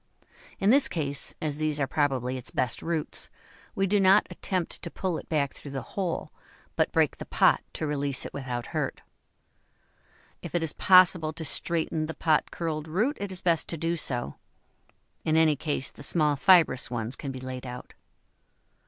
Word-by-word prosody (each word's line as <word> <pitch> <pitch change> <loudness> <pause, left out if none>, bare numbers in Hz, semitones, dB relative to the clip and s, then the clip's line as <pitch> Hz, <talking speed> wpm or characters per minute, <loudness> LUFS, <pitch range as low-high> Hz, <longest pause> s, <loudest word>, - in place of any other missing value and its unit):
In 200 +2 +3
this 280 +2 +6
case, 145 -4 -1
as 150 -1 -2
these 155 -1 0
are 145 - +2
probably 130 -3 0
its 125 - -3
best 125 -2 -1
roots, 165 -2 -2 0.5
we 195 - +1
do 200 +2 +2
not 195 +2 +5
attempt 185 -3 -3
to 170 - -6
pull 180 -1 -3
it - - -14
back 145 -4 0
through 145 - -10
the 135 -1 -5
hole, 185 -4 -3 0.4
but - - +1
break - - +2
the - - -7
pot - - +3
to - - -3
release 145 -2 -1
it - - -7
without 125 -3 -4
hurt. - - -2 1.4
If - - -7
it 170 - +1
is 160 - -1
possible 180 -4 +5
to 160 +1 -7
straighten 160 +1 0
the 165 - -6
pot 155 -2 +1
curled 160 -2 -4
root, 215 - 0
it 200 -1 -4
is 185 -1 -4
best 170 -4 +1
to 165 - -3
do 165 +2 -1
so; 120 - -3 0.9
in 155 0 +2
any 160 -2 +4
case, 145 -1 -3
the - - -14
small 150 0 +2
fibrous 155 -6 +4
ones 120 0 -3
can 140 - -6
be 130 - -7
laid 130 0 -7
out. 125 0 -9
155 Hz, 180 wpm, -27 LUFS, 140-170 Hz, 1.4 s, this